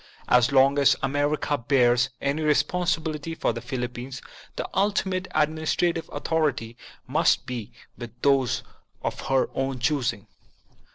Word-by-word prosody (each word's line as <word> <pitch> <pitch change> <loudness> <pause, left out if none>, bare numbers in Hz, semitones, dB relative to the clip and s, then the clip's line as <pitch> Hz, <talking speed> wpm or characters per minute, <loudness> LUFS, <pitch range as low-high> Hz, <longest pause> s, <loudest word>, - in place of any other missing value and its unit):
As 125 0 +4
long 140 +1 +4
as 140 - +5
America 145 +1 0
bears 125 0 +3
any 140 +3 -1
responsi 155 +4 +2
bility 160 0 -5
for - - 0
the 115 - -6
Philippines, 125 +1 -5 0.4
the - - -3
ultimate 190 -2 0
administrative 160 +2 0
authority 145 -8 -1 0.3
must - - +2
be 120 -3 -5 0.3
with 120 -1 -9
those 135 -3 +2 0.4
of - - -3
her 135 -1 +1
own 135 0 -2
choosing. 125 -5 -1
140 Hz, 125 wpm, -25 LUFS, 125-155 Hz, 0.4 s, as